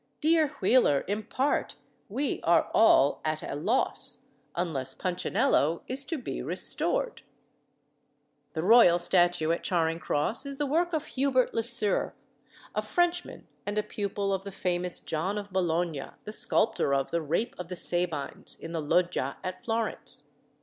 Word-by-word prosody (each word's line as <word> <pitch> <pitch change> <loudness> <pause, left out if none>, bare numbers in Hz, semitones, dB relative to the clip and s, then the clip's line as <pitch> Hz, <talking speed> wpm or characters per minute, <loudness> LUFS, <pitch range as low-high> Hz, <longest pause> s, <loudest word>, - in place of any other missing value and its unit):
Dear 315 0 +3
Wheeler, 190 - +3
impart 220 +7 -1 0.3
wee 265 +7 -1
are 170 0 +3
all 145 -10 +5
att 155 0 -2
a - - -5
loss, 215 - 0 0.3
Unless 160 -7 -2
Punchinello 170 -3 +1
is 265 +2 -2
to 325 - -3
be 255 - -5
restored." - - 0 1.3
The 160 - -2
royal 205 -4 +7
statue 175 -2 +3
at 170 - -1
Charing 165 -2 0
Cross 175 - 0
is 275 -1 -6
the 295 - 0
work 335 +5 +1
of 315 - -1
Hubert 260 -2 +1
Le 230 - +1
Sœur, 225 -3 0 0.6
a - - 0
Frenchman 350 0 -1 0.2
and 205 +1 -3
a 210 - +2
pupil 200 -1 -2
of 190 0 -2
the 200 - -7
famous 180 -2 -1
John 175 +6 -2
of 205 -2 -6
Bologna, 170 -5 0 0.2
the 210 - -7
sculptor 175 -11 +2
of 135 -1 -1
the 170 - 0
"Rape 170 - -1
of 180 - -5
the 180 - -5
Sabines" 175 -5 -2
in 165 - -8
the 165 -1 -2
Loggia 165 -3 0
at 185 0 -5
Florence. 225 -1 -2
190 Hz, 150 wpm, -28 LUFS, 165-240 Hz, 1.3 s, royal